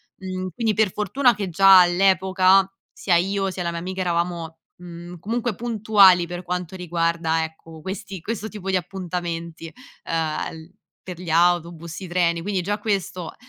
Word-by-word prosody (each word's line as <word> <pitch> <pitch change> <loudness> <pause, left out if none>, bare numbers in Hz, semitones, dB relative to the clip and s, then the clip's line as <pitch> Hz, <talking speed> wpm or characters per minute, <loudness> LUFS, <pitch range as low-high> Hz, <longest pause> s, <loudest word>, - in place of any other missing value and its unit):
Mhmm, 185 0 -5
quindi 225 -3 0
per 210 -2 +2
fortuna 240 +6 +2
che 200 -3 -4
già 195 +2 +7
all'epoca 190 +1 +4 0.3
sia 180 - +1
io, 195 +3 +1
sia 185 -1 -4
la 170 - -2
mia 170 - -4
amica 185 +2 -5
eravamo, 170 -2 -2 0.2
mhmm, 175 0 -10
comunque 230 +4 -2
puntuali 205 -6 +4
per 175 +1 -6
quanto 180 0 -4
riguarda 170 -2 -1
ecco, 160 0 -13
questi 190 +2 -6
questo 220 +3 -4
tipo 200 -3 -7
di 190 - +1
appuntamenti, 170 -3 -5 0.3
ehm, 160 -2 -2
l 160 +1 -12 0.3
per 180 -2 -8
gli 175 -3 -5
autobus, 170 -1 +1
i 185 - -6
treni. 170 -1 +1
Quindi 195 -1 -1
già 205 +4 -2
questo 195 -5 -3
180 Hz, 160 wpm, -23 LUFS, 170-195 Hz, 0.3 s, già